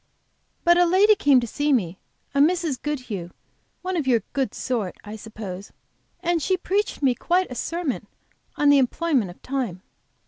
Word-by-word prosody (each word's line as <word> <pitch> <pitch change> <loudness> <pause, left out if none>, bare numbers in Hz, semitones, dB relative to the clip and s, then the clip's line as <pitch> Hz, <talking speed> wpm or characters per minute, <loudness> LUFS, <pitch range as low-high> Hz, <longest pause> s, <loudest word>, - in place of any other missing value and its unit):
"But 345 0 +5
a 355 - +6
lady 390 +5 +6
came 285 -9 +4
to - - -2
see 290 +6 -1
me, 190 -9 0 0.3
a 280 - +1
Mrs. 320 -2 +2
Goodhue, 250 - -4 0.5
one 370 0 -2
of 310 -6 -1
your 235 -5 +3
good 270 -2 -1
sort, 225 -8 -2
I 210 +1 -7
suppose, 205 -3 -8 0.5
and 345 -2 +1
she 375 +5 +1
preached 390 -2 -1
me 260 -2 +4
quite 355 +6 0
a - - -3
sermon 330 +3 -3 0.5
on 290 - +3
the 285 -1 +7
employment 265 - +1
of 175 - -12
time. 245 -9 -3
275 Hz, 170 wpm, -24 LUFS, 225-340 Hz, 0.5 s, the